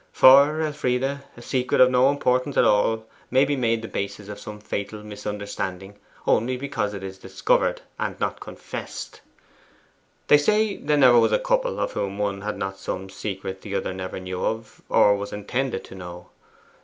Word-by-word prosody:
For, 140 +4 +7
Elfride, 135 -5 0 0.3
a - - -10
secret 125 0 0
of 130 0 +7
no 130 +1 +5
importance 130 -1 0
at - - +5
all 110 +2 +2 0.2
may 130 +2 +4
be 145 +1 0
made 115 -3 0
the - - -4
basis 100 0 -5
of 105 - -7
some 105 0 -8
fatal 105 0 -5
misunderstanding 100 -2 -5 0.3
only 125 +3 +2
because 115 -6 -2
it 95 - -7
is 95 0 -7
discovered, 95 0 0 0.2
and - - -3
not - - -2
confessed. - - -8 1.0
They 150 - +6
say 210 +5 +2
there 150 0 +1
never 125 -4 +7
was 115 - +3
a - - +5
couple - - 0
of - - -1
whom 100 0 -3
one 100 -1 -2
had 105 +1 -4
not 95 0 -4
some 95 +1 -5
secret 95 -2 -5
the 100 -1 -5
other 95 -1 -2
never 95 0 -5
knew 95 +5 -3 0.2
or 100 - +5
was 100 0 -5
intended 125 +2 -2
to - - -12
know. 90 -1 -9
105 Hz, 175 wpm, -24 LUFS, 100-130 Hz, 1.0 s, For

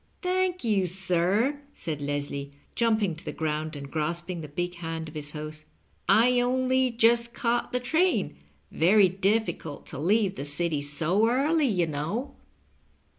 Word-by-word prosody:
Thank 365 0 0
you, 205 -5 +2
sir," 190 - 0
said 150 -3 -4
Leslie, 140 0 -3 0.2
jumping 220 -6 +1
to 170 - -9
the - - -4
ground 155 0 -3
and 140 -1 -8
grasping 170 +3 -2
the 155 - -7
big 175 +5 -3
hand 165 -1 -5
of 155 - -10
his 150 -1 -6
host; 155 0 -7
^' - - -33 0.4
I 245 +2 +5
only 255 +1 +2
just 235 0 +2
caught 240 0 0
the 250 - 0
train 320 +9 +1 0.2
— - - -29
^veiy 190 +2 +4
difficult 200 -7 0
to 135 - -7
leave 195 +4 +2
the - - -3
City 150 +1 +2
so 165 +9 +1
early, 290 +4 +2
you 180 -7 +1
know." 160 - -3
185 Hz, 160 wpm, -27 LUFS, 155-235 Hz, 0.4 s, I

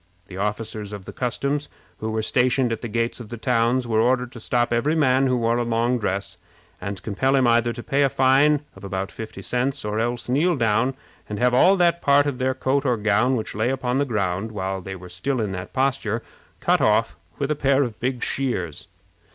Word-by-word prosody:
The 95 -1 -10
officers 105 +1 -3
of 100 -2 -8
the - - -8
customs, 140 +4 -2 0.3
who 110 - -3
were 110 0 -1
stationed 125 +1 +2
at 115 - -3
the 120 - -4
gates 115 +2 -1
of 115 -3 -9
the 120 - -6
towns, 120 +2 +1
were 110 -1 +2
ordered 125 +1 +1
to 120 - -10
stop 120 +1 0
every 145 +7 +1
man 135 -3 +3
who 125 -1 +2
wore 115 0 +1
a - - +1
long 120 +1 +1
dress, 100 -2 -2 0.4
and 100 +1 -4
compel 130 +6 +1
him 130 -2 +3
either 120 0 +3
to 120 +1 -7
pay 140 +1 +1
a 140 - +4
fine 135 +3 +4
of 95 - -14
about 95 0 -3
fifty 110 -3 -8
cents, 130 +3 -1
or 105 +1 -1
else 120 +1 -2
kneel 155 +8 +2
down 115 +1 +1 0.3
and 105 - -4
have 125 +3 +2
all 185 +10 +5
that 170 -1 +3
part 145 0 +4
of 140 -3 -2
their 130 0 0
coat 135 +2 0
or 125 -4 +1
gown 110 +5 +2
which 110 - -3
lay 110 +3 0
upon 130 -1 -1
the 145 - +2
ground, 100 -3 -1
while 95 -2 -3
they 95 +1 -6
were 90 -1 -11
in 125 -7 0
that 90 0 -6
posture, 120 -4 0 0.4
cut - - +2
off 65 - +2 0.2
with 140 +1 -1
a - - +1
pair 140 -1 +3
of 115 -5 -5
big 125 0 -2
shears. 95 - -3
120 Hz, 215 wpm, -23 LUFS, 105-130 Hz, 0.4 s, all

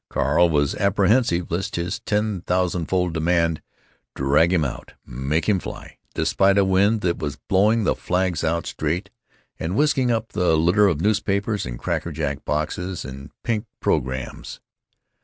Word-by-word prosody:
Carl 85 0 +2
was 75 -3 +1
apprehensive 100 -2 +2
lest 90 +3 -2
this 85 +3 -2
ten 105 -3 -1
thousandfold 90 -1 0
demand 85 0 +1 0.5
drag 75 +5 +3
him 85 -5 +2
out, 65 - -7
make 70 +6 -2
him 100 -3 +3
fly, - - -9 0.2
despite 100 0 +2
a 100 - +4
wind 100 +3 +3
that 85 -3 0
was 75 -2 -3
blowing 105 +4 +3
the - - +2
flags 90 -2 -1
out 85 +1 0
straight, 90 +6 -3 0.5
and 80 +4 -2
whisking 140 -2 +2
up 115 -1 0
the 90 -5 +2
litter 90 +6 +4
of 85 -5 0
newspapers 105 - 0
and - - -5
cracker 85 - -2
jack 75 -2 -3
boxes 85 +4 -2
and 70 +2 -8
pink 115 -1 -1
programs. 65 0 -2
90 Hz, 150 wpm, -23 LUFS, 80-100 Hz, 0.5 s, a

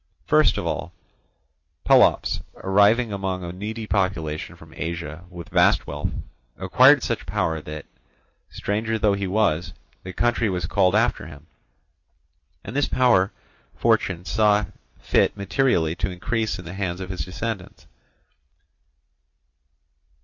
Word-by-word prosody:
First 155 0 +3
of - - -3
all 80 +1 -3 0.9
Pelops, - - +4
arriving 105 +4 +3
among 95 -2 -3
a 85 - -5
needy 110 +5 -5
population 90 -7 -2
from - - -16
Asia 85 0 -5
with 85 -2 -10
vast - - +3
wealth, - - -3 0.5
acquired - - +5
such - - -3
power 80 -1 -1
that, 75 -1 -8 0.6
stranger 110 +2 -2
though 105 -2 +2
he 100 -1 -2
was, 90 -4 0 0.3
the 95 - -8
country 115 +2 +1
was 90 -3 -2
called 95 +2 +2
after 110 -6 +1
him; 75 -1 -13 1.2
and 110 - -8
this 145 - +2
power 115 -7 +3 0.4
fortune 90 -1 +1
saw 105 0 +2 0.3
fit - - +1
materially 100 -5 +1
to 100 - -1
increase 110 +5 -2
in 90 - -10
the 85 - -7
hands 95 -2 -3
of 95 0 -6
his 95 - -3
descendants. 100 0 -6
95 Hz, 130 wpm, -23 LUFS, 85-110 Hz, 1.2 s, acquired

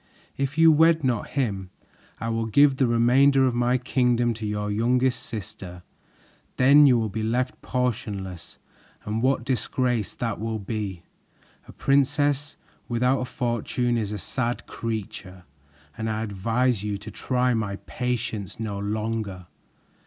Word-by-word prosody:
If 140 +2 -2
you 165 0 +7
wed 160 +1 +4
not 120 -5 0
him, 100 -8 -1 0.5
I 115 - -3
will 115 0 -1
give 140 +4 +4
the 130 - +3
remainder 130 +4 +4
of 130 - +1
my 120 +1 +2
kingdom 120 -1 +1
to 110 -1 -5
your 105 0 -2
youngest 125 +4 +1
sister. 100 -6 -7 0.7
Then 140 +3 +7
you 125 -3 +5
will 115 - 0
be 110 +2 -4
left 120 +4 -1
portionless, 105 -8 -3 0.5
and 110 +2 -2
what 130 -1 +1
disgrace 125 -3 -1
that 115 -2 -3
will 110 +1 -2
be! 100 -4 -5 0.6
A - - -10
princess 145 +1 +1 0.3
without 125 +2 +2
a 125 - -2
fortune 120 0 -1
is 105 -3 -2
a 105 - -3
sad 120 +5 -3
creature, 100 -5 -6 0.5
and 110 0 -3
I 110 0 -2
advise 115 +3 0
you 105 -1 -2
to 105 +2 -9
try 125 +4 0
my 105 -3 -1
patience 115 -4 -4
no 105 -3 -3
longer." 105 -2 -3
115 Hz, 145 wpm, -25 LUFS, 105-130 Hz, 0.7 s, you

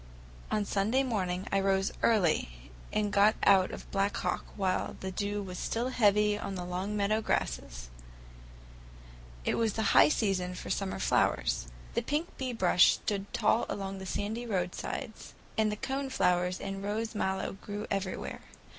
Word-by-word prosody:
On 210 -1 0
Sunday 215 +8 +1
morning 190 -7 -2
I 195 - +3
rose 195 0 +2
early 155 - +1 0.2
and 205 -1 0
got 205 +2 +5
out 190 -2 +6
of - - -9
Black 195 +1 +1
Hawk - - -1
while 190 -2 -1
the 190 - -4
dew 205 +2 -2
was 180 -2 -6
still 235 +3 -1
heavy 210 -3 +3
on 195 - -4
the 180 -1 -4
long 185 +4 -3
meadow 210 +2 +1
grasses. - - -2 1.5
It - - +1
was 225 -3 +1
the 220 - -1
high - - +8
season 190 -9 0
for - - -6
summer 195 -1 -1
flowers. - - +1 0.3
The - - +1
pink 300 +3 -2
bee 260 -1 -2
bush 185 -6 +5
stood 200 -1 -3
tall 230 - +2
along 195 -1 -4
the 190 - -7
sandy 220 +6 -3
roadsides, 190 +2 -4 0.2
and 215 -1 +2
the - - -2
cone 270 +5 -3
flowers 180 -5 +1
and 195 0 -5
rose 220 +3 -2
mallow 190 -2 -1
grew 205 +1 -5
everywhere. 195 -2 -3
200 Hz, 160 wpm, -30 LUFS, 185-215 Hz, 1.5 s, high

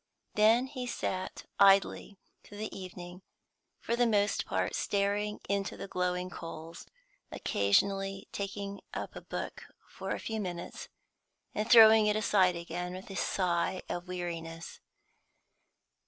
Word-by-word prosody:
Then 225 +4 +5
he 260 -2 -5
sat 185 -5 -3
idly 195 0 +4 0.3
through 205 - -12
the 215 +1 -5
evening, 180 -1 -8 0.6
for 235 - -1
the 240 0 +3
most 205 -2 +1
part - - -1
staring 205 +1 0
into 200 -1 -1
the - - -6
glowing 180 0 -1
coals, 165 0 -8 0.4
occasionally 195 - +1
taking 200 0 -5
up - - -5
a - - -7
book - - -6 0.2
for - - -7
a - - 0
few 220 -1 -3
minutes, 175 -4 -5 0.7
and 215 +1 -2
throwing 220 -2 +9
it 210 - +2
aside 190 -4 +3
again 175 +1 -5
with 190 +2 -9
a - - -6
sigh 180 0 0
of 175 +1 -4
weariness. 165 -2 -5
195 Hz, 130 wpm, -31 LUFS, 180-210 Hz, 0.7 s, throwing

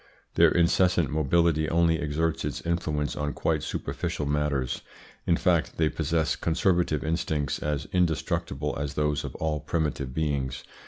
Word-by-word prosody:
Their - - +6
incessant 85 -3 +3
mobility 80 +1 +2
only 85 -1 +3
exerts 80 +1 -1
its - - -3
influence 75 -3 -1
on 75 -1 -2
quite 80 -2 0
superficial 75 - -3
matters. 70 -3 -1 0.5
In 85 - +4
fact 85 -3 +1
they 80 -1 +3
possess 80 0 0
conservative 85 -2 +1
instincts 80 -3 -1
as 75 -1 -2
indestructible 80 -4 0
as 70 0 -3
those 75 -1 0
of - - -6
all 80 -1 -1
primitive 75 -4 -2
beings. 70 -3 -2
75 Hz, 140 wpm, -27 LUFS, 75-85 Hz, 0.5 s, Their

